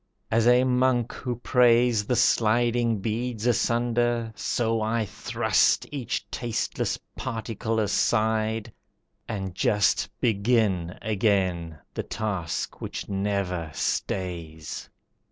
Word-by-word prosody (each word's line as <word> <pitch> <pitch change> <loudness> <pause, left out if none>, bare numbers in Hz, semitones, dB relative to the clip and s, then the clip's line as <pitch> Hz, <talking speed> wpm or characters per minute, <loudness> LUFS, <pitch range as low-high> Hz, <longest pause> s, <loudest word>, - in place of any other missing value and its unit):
As 115 +1 +3
a 125 +1 +6
monk 125 -2 +2
who 125 -1 -4
prays 120 -2 +4
The 125 - +2
sliding 115 -1 +2
beads 115 +1 -2
asunder, 120 -1 +1
so 115 0 0
I 110 +1 0
thrust - - +1
Each 140 -5 -3
tasteless 120 -3 -2 0.2
particle 115 0 -3
aside, 110 +1 +1 0.5
and 95 -4 -4
just 100 0 +2
Begin 100 -6 +1
again 95 -6 0 0.2
the - - -2
task 95 -7 -3
which - - -5
never 95 -4 -1
stays. 85 -4 -3
110 Hz, 100 wpm, -26 LUFS, 100-120 Hz, 0.5 s, a